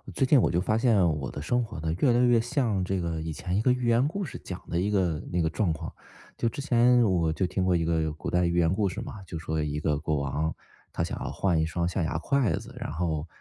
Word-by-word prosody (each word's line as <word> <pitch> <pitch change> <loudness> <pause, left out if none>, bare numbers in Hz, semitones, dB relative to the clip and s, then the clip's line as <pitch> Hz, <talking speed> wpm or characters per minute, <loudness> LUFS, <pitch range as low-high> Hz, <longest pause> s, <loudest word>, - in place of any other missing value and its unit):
最 135 - +2
近 130 -1 +5
我 - - +2
就 85 - +1
发 110 +4 +1
现 105 -8 +4
我 70 - -4
的 70 - -6
生 120 +8 +1
活 105 -7 -7
呢， 80 0 -1
越 130 - +4
来 120 - +3
越 120 -2 +4
像 115 -6 0
这 95 +1 -1
个 85 -2 -2
以 80 0 -4
前 90 +4 -3
一 105 - +2
个 125 - +3
寓 125 -1 0
言 120 +2 +4
故 195 +5 -3
事 - - -7
讲 90 -1 -7
的 85 - -1
一 100 +3 0
个 90 -6 +1
那 90 -1 +1
个 80 - +1
状 90 +2 0
况。 80 - -5 0.4
就 115 - +1
之 115 - -9
前 125 -3 +4
我 90 -6 +2
就 95 +4 0
听 90 +1 -1
过 90 -1 +2
一 85 - -1
个 80 -1 0
古 75 - -8
代 90 0 +2
寓 85 +1 0
言 85 0 +3
故 100 0 +1
事 90 - -6
嘛， 105 - -8
就 85 - -5
说 80 -1 -2
一 75 0 -2
个 75 -1 0
国 75 0 -1
王， 70 +3 -1 0.4
他 - - -2
想 - - -4
要 - - -3
换 90 -5 +1
1 - - +1
双 85 +1 -1
象 90 0 -1
牙 80 -1 -1
筷 125 - +1
子， - - -8
然 - - -4
后， 80 -1 -2
90 Hz, 295 characters per minute, -27 LUFS, 80-115 Hz, 0.4 s, 近